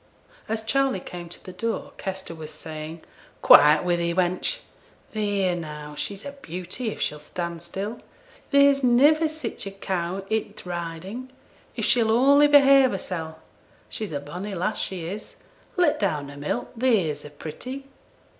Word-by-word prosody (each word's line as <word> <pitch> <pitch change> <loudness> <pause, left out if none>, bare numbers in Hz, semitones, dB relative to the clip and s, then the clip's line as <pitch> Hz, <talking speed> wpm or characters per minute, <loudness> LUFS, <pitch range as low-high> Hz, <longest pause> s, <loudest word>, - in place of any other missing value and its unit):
As 220 0 -2
Charley 270 -2 +1
came 175 -1 -8
to - - -10
the 185 - -9
door, 225 +5 -3
Kester 190 -3 -5
was 160 -2 -8
saying, 155 +1 -8 0.4
'Quiet 150 +1 +8
wi' 175 -1 +2
thee, 170 0 -1
wench! 185 - 0 0.5
Theere 200 -4 +1
now, 150 -3 -7
she's 200 - -4
a 280 - -4
beauty, 185 - -5
if - - -6
she'll 150 - -1
stand 170 +2 -5
still. 195 +6 -5 0.5
There's 280 -1 +5
niver 290 +6 +5
sich 310 -9 -5
a - - -5
cow 190 -1 -3
i' 220 0 0
t' - - -9
Riding; 175 +8 -5 0.5
if - - -1
she'll 230 -3 +3
only 280 +6 +6
behave 275 -2 +7
hersel'. 165 -6 -4 0.5
She's 215 -4 -1
a 145 - -2
bonny 180 +8 -6
lass, 185 +5 -1
she 180 -4 -3
is; 195 +5 -7 0.4
let 350 -5 +3
down 150 -8 -1
her 140 - -10
milk, 145 +1 -3
theere's 205 - +1
a 150 - -9
pretty!' 250 - -7
190 Hz, 155 wpm, -25 LUFS, 165-240 Hz, 0.5 s, Quiet